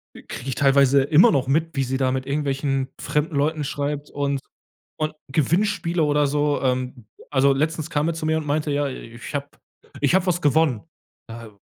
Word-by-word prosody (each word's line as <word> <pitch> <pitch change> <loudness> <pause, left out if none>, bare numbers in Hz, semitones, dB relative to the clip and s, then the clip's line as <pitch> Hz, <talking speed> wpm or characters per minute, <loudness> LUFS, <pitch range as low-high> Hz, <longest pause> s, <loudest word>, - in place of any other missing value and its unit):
kriege 130 - -8
ich 130 - -2
teilweise 140 0 +4
immer 160 - +5
noch 135 -6 +1
mit, 160 +4 +1
wie 135 - +1
sie 130 +1 -2
da 130 -1 +1
mit 130 0 -3
irgendwelchen 135 -2 -1
fremden 150 +1 -1
Leuten 150 +2 0
schreibt 145 +1 -3
und 140 -1 -1 0.6
und 155 0 -1 0.2
Gewinnspiele 170 +3 +1
oder 150 -1 +2
so 145 +1 0
ähm, 125 -3 -2 0.2
also 140 0 +4
letztens 155 +3 -1
kam 150 0 0
er 165 - 0
zu 160 0 -5
mir 160 0 +2
und 160 - -4
meinte, 150 +1 -1
ja: 145 0 0
„Ich 120 0 -9
habe 140 0 -2 0.5
ich 145 +3 +2
habe 190 -1 +2
was 175 -1 +1
gewonnen.“ 145 - +2 0.5
„Ja, 115 -1 -9
145 Hz, 185 wpm, -23 LUFS, 135-155 Hz, 0.6 s, immer